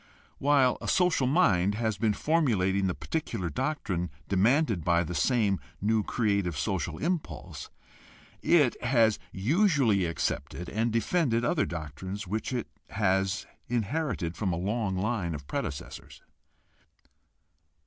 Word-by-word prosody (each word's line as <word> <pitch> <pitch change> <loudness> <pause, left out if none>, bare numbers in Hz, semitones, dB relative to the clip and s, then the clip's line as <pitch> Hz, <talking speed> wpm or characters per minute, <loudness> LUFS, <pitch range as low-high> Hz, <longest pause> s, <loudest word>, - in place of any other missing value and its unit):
While 135 -3 +3
a - - -5
social 180 -8 +3
mind 105 - +3
has 110 -3 -1
been 110 -1 +2
formulating 100 - +1
the 90 - -1
particular 95 - -3
doctrine 95 - -2 0.2
demanded 110 - +2
by 85 +1 +3
the 90 - -5
same 100 - +2 0.2
new 110 +2 +2
creative 100 - 0
social 85 -3 -2
impulse, 150 - -4 0.7
it 150 -8 +3
has 115 -4 +3
usually 130 - +2
accepted 85 0 -3
and 115 +2 0
defended 120 0 +1
other 155 +4 +1
doctrines 85 +5 -6
which 105 +6 -3
it 125 -3 -2 0.2
has 95 -1 0 0.2
inherited 120 - -1
from 100 -4 -1
a 85 - -1
long 100 +1 -1
line 95 -5 -1
of 75 -1 -8
predecessors. 70 0 -6
105 Hz, 120 wpm, -28 LUFS, 90-125 Hz, 0.7 s, While